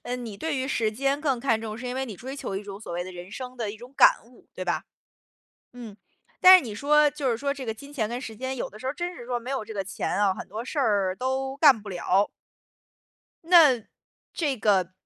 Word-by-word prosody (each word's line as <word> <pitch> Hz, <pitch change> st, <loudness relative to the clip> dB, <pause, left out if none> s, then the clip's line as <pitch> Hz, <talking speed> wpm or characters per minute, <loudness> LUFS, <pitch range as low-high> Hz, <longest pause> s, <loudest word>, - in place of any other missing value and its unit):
呃， 245 Hz, -, -4 dB
你 230 Hz, -5 st, -7 dB
对 315 Hz, +5 st, -2 dB
于 260 Hz, 0 st, -1 dB
时 225 Hz, -5 st, +1 dB
间 275 Hz, +5 st, 0 dB
更 275 Hz, -5 st, 0 dB
看 230 Hz, -4 st, +1 dB
重， 220 Hz, -1 st, -5 dB
是 245 Hz, +2 st, -7 dB
因 250 Hz, -, -3 dB
为 265 Hz, +1 st, -2 dB
你 215 Hz, -5 st, -8 dB
追 265 Hz, +7 st, -7 dB
求 195 Hz, -, -4 dB
一 195 Hz, -, -4 dB
种 200 Hz, -1 st, -9 dB
所 220 Hz, -, -8 dB
谓 175 Hz, +1 st, -2 dB
的 185 Hz, -, -8 dB
人 180 Hz, +1 st, -10 dB
生 255 Hz, +3 st, -7 dB
的 225 Hz, -4 st, -3 dB
一 210 Hz, -, -9 dB
种 245 Hz, +4 st, -13 dB
感 -, -, +6 dB
悟， 235 Hz, +1 st, -21 dB
对 185 Hz, -, -5 dB
吧？ 175 Hz, -, -1 dB, 0.9 s
嗯， 235 Hz, -5 st, -10 dB, 0.4 s
但 370 Hz, 0 st, +11 dB
是 365 Hz, -, +1 dB
你 220 Hz, -4 st, -6 dB
说， 295 Hz, +5 st, +4 dB
就 285 Hz, -3 st, -2 dB
是 230 Hz, -, 0 dB
说 280 Hz, +4 st, -1 dB
这 275 Hz, -2 st, -7 dB
个 225 Hz, -, -2 dB
金 280 Hz, +6 st, -13 dB
钱 225 Hz, -7 st, -1 dB
跟 240 Hz, +2 st, -4 dB
时 225 Hz, -5 st, -8 dB
间， 260 Hz, +3 st, -4 dB
有 -, -, -3 dB
的 215 Hz, -, -12 dB
时 260 Hz, -, -7 dB
候 -, -, +1 dB
儿 -, -, -7 dB
真 350 Hz, +2 st, -4 dB
是 240 Hz, -, -10 dB
说 245 Hz, -1 st, -1 dB
没 245 Hz, +3 st, -7 dB
有 270 Hz, -5 st, -2 dB
这 220 Hz, +1 st, -9 dB
个 200 Hz, -, -1 dB
钱 190 Hz, 0 st, -3 dB
哦， 195 Hz, -2 st, +3 dB
很 -, -, -6 dB
多 220 Hz, +4 st, -6 dB
事 290 Hz, -, -5 dB
儿 200 Hz, -7 st, +1 dB
都 265 Hz, +2 st, -2 dB
干 280 Hz, -6 st, +6 dB
不 210 Hz, -, -10 dB
了。 190 Hz, +2 st, +1 dB, 1.2 s
那 320 Hz, -8 st, +6 dB, 0.5 s
这 290 Hz, -5 st, -1 dB
个 195 Hz, -5 st, +2 dB
245 Hz, 275 characters per minute, -26 LUFS, 210-275 Hz, 1.2 s, 但